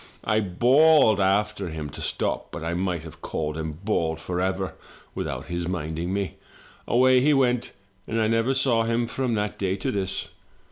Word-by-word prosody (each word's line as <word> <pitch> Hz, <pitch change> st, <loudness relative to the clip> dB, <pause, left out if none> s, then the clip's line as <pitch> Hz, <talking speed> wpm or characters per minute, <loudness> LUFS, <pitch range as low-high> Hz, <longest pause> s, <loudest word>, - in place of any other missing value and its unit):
I 110 Hz, +1 st, +2 dB
bawled 120 Hz, -, +5 dB
after 100 Hz, 0 st, +1 dB
him 75 Hz, -3 st, -5 dB
to -, -, -8 dB
stop; -, -, -2 dB
but -, -, -6 dB
I 85 Hz, +1 st, -2 dB
might 90 Hz, -2 st, -1 dB
have 80 Hz, -2 st, -12 dB
called 75 Hz, -1 st, -3 dB
and 80 Hz, +3 st, -6 dB
bawled 80 Hz, -6 st, 0 dB
forever, 95 Hz, +3 st, -2 dB, 0.4 s
without -, -, -4 dB
his 85 Hz, -1 st, -3 dB
minding 85 Hz, 0 st, -3 dB
me. 100 Hz, -1 st, -2 dB, 0.5 s
Away 130 Hz, +1 st, +5 dB
he 145 Hz, +3 st, +4 dB
went 125 Hz, -3 st, +1 dB, 0.4 s
and 115 Hz, -, -1 dB
I 110 Hz, -, +2 dB
never 115 Hz, +4 st, +1 dB
saw 130 Hz, -4 st, +2 dB
him 115 Hz, +1 st, +1 dB
from 125 Hz, 0 st, -1 dB
that 105 Hz, 0 st, -2 dB
day 95 Hz, -1 st, 0 dB
to 95 Hz, -, -2 dB
this. 95 Hz, -1 st, -3 dB
100 Hz, 175 wpm, -25 LUFS, 85-115 Hz, 0.5 s, bawled